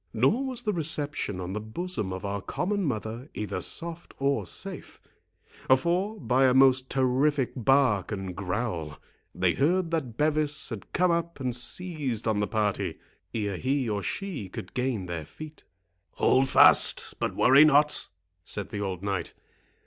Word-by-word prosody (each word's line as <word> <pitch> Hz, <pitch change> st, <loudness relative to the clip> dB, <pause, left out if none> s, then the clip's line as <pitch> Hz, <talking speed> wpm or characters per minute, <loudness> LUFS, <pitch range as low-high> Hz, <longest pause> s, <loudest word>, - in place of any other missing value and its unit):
Nor 140 Hz, -, +2 dB
was 255 Hz, -2 st, -4 dB
the 210 Hz, -3 st, 0 dB
reception 150 Hz, -, -1 dB
on 90 Hz, +1 st, -4 dB
the 105 Hz, -, -2 dB
bosom 110 Hz, -, -4 dB
of 95 Hz, +1 st, -5 dB
our 100 Hz, 0 st, -3 dB
common 200 Hz, -, -2 dB
mother 115 Hz, +1 st, -4 dB
either 105 Hz, -2 st, -3 dB
soft 170 Hz, 0 st, -5 dB
or 135 Hz, -8 st, 0 dB
safe; -, -, -8 dB, 0.8 s
for, 185 Hz, +9 st, -1 dB
by 125 Hz, +2 st, +2 dB
a 130 Hz, -1 st, +4 dB
most 130 Hz, -1 st, +5 dB
terrific 135 Hz, +1 st, +1 dB
bark 125 Hz, -5 st, +2 dB
and 95 Hz, -3 st, -4 dB
growl, 90 Hz, -5 st, -3 dB, 0.4 s
they 90 Hz, -1 st, +2 dB
heard 170 Hz, +4 st, +1 dB
that 135 Hz, -9 st, -2 dB
Bevis 150 Hz, 0 st, +1 dB
had 110 Hz, -6 st, -8 dB
come 180 Hz, 0 st, +2 dB
up 170 Hz, -2 st, -2 dB
and 125 Hz, -3 st, -2 dB
seized 135 Hz, -, -3 dB
on 110 Hz, -2 st, +1 dB
the 105 Hz, -, 0 dB
party, 105 Hz, -2 st, -1 dB, 0.4 s
ere 100 Hz, -4 st, -2 dB
he 130 Hz, +2 st, 0 dB
or 105 Hz, -2 st, -1 dB
she 170 Hz, -, -4 dB
could 90 Hz, -, -8 dB
gain 125 Hz, -6 st, -1 dB
their 85 Hz, -2 st, -4 dB
feet. 155 Hz, -, -11 dB, 0.5 s
"Hold 135 Hz, +1 st, +3 dB
fast, -, -, +5 dB
but -, -, -2 dB
worry 135 Hz, +4 st, +7 dB
not," 150 Hz, 0 st, +3 dB, 0.4 s
said 100 Hz, +1 st, -3 dB
the 100 Hz, -, -4 dB
old 95 Hz, -2 st, -4 dB
knight. 100 Hz, -3 st, -3 dB
130 Hz, 155 wpm, -27 LUFS, 105-155 Hz, 0.8 s, worry